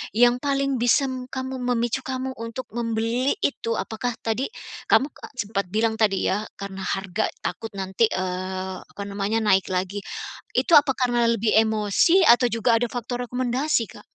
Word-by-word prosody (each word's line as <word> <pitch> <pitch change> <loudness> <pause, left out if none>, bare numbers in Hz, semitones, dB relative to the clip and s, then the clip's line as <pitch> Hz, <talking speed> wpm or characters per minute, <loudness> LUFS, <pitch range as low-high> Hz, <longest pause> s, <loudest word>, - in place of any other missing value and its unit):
yang 245 +2 +5
paling 275 -1 0
bisa 245 +4 +4 0.3
kamu 260 0 -4
memicu 240 0 0
kamu 260 0 -3
untuk 230 +3 -5
membeli 230 - 0
itu, 230 -4 0
apakah 230 +2 -3
tadi, 225 +4 -1 0.4
kamu 280 +2 +4 0.2
sempat 200 -5 -2
bilang 220 +3 0
tadi 205 -3 +2
ya, 210 +3 -1
karena 195 -1 -7
harga 195 +2 -1 0.2
takut 225 - -3
nanti, 190 +3 +1
eee, 185 0 -3
apa 200 - -9
namanya, 200 +2 -1
naik 190 -3 +3
lagi. 185 +2 -2 0.5
Itu 340 - +2
apa 285 -3 +6
karena 240 -2 +2
lebih 225 -1 +1
emosi 220 - +4
atau 240 +1 +6
juga 230 +1 +2
ada 240 -1 -1
faktor 245 0 -4
rekomendasi, 255 +2 0
Kak? - - -14
230 Hz, 150 wpm, -24 LUFS, 205-250 Hz, 0.5 s, apa